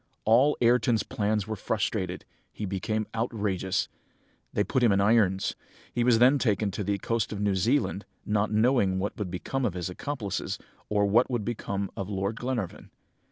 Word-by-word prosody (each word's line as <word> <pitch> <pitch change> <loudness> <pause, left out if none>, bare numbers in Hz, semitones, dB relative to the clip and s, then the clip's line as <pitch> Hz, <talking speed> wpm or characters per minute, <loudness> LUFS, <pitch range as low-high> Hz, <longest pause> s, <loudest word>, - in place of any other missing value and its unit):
"All 125 +7 +5
Ayrton's 120 -2 +3
plans 105 -1 -1
were 110 +1 -3
frustrated! 95 -3 -2 0.3
He 105 - -5
became 105 +3 -2
outrageous. 105 -5 -1 0.6
They 105 - +1
put 130 - 0
him 120 -3 +5
in 100 - +3
irons. 100 -2 +3 0.4
He 120 - +1
was 120 -2 +5
then 130 +4 +5
taken 105 -4 +1
to 100 +2 -3
the 100 0 0
coast 115 +2 -1
of 105 - -4
New 100 -1 +1
Zealand, 105 +1 +1 0.2
not 105 0 +1
knowing 110 -3 +3
what 100 +2 -2
would 100 -3 -2
become 115 +9 -3
of 105 -7 0
his 90 0 -3
accomplices, 110 -1 -3 0.3
or 105 -1 +2
what 110 +5 +3
would 120 -5 -1
become 100 -4 -3
of 95 0 -4
Lord 100 +2 -2
Glenarvan. 120 -7 -3
105 Hz, 170 wpm, -28 LUFS, 100-115 Hz, 0.6 s, All